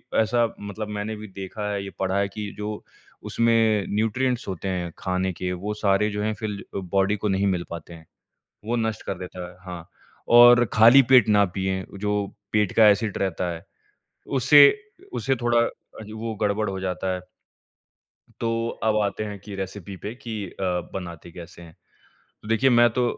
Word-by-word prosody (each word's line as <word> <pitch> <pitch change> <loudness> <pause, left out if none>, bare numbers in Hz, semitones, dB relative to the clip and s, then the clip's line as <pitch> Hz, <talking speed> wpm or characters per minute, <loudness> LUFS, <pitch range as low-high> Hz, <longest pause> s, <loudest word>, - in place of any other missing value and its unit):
ऐसा 115 +2 +3
मतलब 105 +1 -6
मैंने 105 +2 -3
भी 110 0 -9
देखा 100 +2 -6
है, 100 -1 -3
ये 100 - -6
पढ़ा 95 0 0
है 100 - +1
कि 105 0 -6
जो 105 0 -5 0.4
उसमें 115 -3 +2
न्यूट्रिएंट्स 125 +3 0
होते 95 0 -5
हैं 90 -2 -2
खाने 95 0 -1
के 90 +1 -4
वो 100 +4 -4
सारे 105 0 +1
जो 105 0 -3
हैं 110 0 0
फ़िर 105 -2 -4
बॉडी 95 +2 0
को 105 - -2
नहीं 95 +1 +1
मिल 90 -3 0
पाते 85 0 -8
हैं, 80 -1 -13 0.6
वो 115 +3 -1
नष्ट 110 -2 -2
कर 95 - -3
देता 90 -1 -7
है 90 - -15
हाँ। 90 -2 -8 0.4
और 120 0 +8
खाली 115 +5 +8
पेट 125 -5 +7
ना 105 -1 +5
पिएँ, 95 0 -1
जो 105 0 -1 0.3
पेट 105 -3 +2
का 110 -2 +8
ऐसिड 105 0 +1
रहता 90 -2 -1
है। 85 0 -9 0.6
उससे 140 +2 +7 0.4
उससे 135 - 0
थोड़ा 120 0 +1
अ, 110 - -9
वो 110 0 -4
गड़बड़ 105 0 0
हो 95 - -4
जाता 95 0 -2
है। 90 - -5 1.2
तो 115 0 -1 0.2
अब 110 -1 +2
आते 100 +1 -2
हैं 105 -1 -6
कि 100 0 -9
रेसिपी 95 0 -6
पे 105 +4 -6
कि 110 -5 -6
अ, - - -8 0.3
बनाते 85 -2 -7
कैसे 85 0 -11
हैं? 80 -1 -14 0.7
तो - - -12
देखिए 115 +4 +3
मैं 120 -1 +5
तो 125 - +1
105 Hz, 180 wpm, -24 LUFS, 95-110 Hz, 1.2 s, और